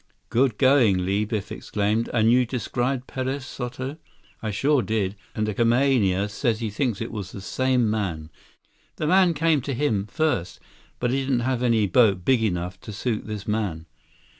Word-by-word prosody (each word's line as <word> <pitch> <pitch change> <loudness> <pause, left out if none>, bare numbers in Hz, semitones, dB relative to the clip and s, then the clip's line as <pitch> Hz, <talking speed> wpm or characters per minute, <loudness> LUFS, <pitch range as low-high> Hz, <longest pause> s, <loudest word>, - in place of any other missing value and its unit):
"Good 120 -2 +2
going, 120 -9 +4
Li," 100 +3 +1
Biff 105 -2 -4
exclaimed. 105 +3 -1
"And 115 -1 +3
you 125 +1 +5
described 125 +2 -2
Perez 130 +1 -3
Soto?" 130 +4 -5 0.4
"I 110 - -3
sure 135 +7 +2
did. 105 -4 -1 0.2
And 110 -1 -1
the 105 - -1
kamaaina 115 -5 +2
says 110 +2 -1
he 110 -3 -3
thinks 115 -1 -1
it 115 - -4
was 100 -4 -6
the - - -8
same 130 +3 +1
man. 90 -8 -2 0.6
The - - -3
man 180 0 +4
came 155 -1 +2
to 135 +1 -3
him, 110 -7 0
first, 145 - -1 0.4
but 125 0 0
he 135 - +1
didn't 130 -2 0
have 125 0 -1
any 115 -4 +3
boat 100 -2 +3
big 130 -3 +3
enough 90 -3 -2
to - - -8
suit 105 +2 -3
this 105 -2 -6
man." 100 -7 -2
115 Hz, 175 wpm, -24 LUFS, 105-130 Hz, 0.6 s, you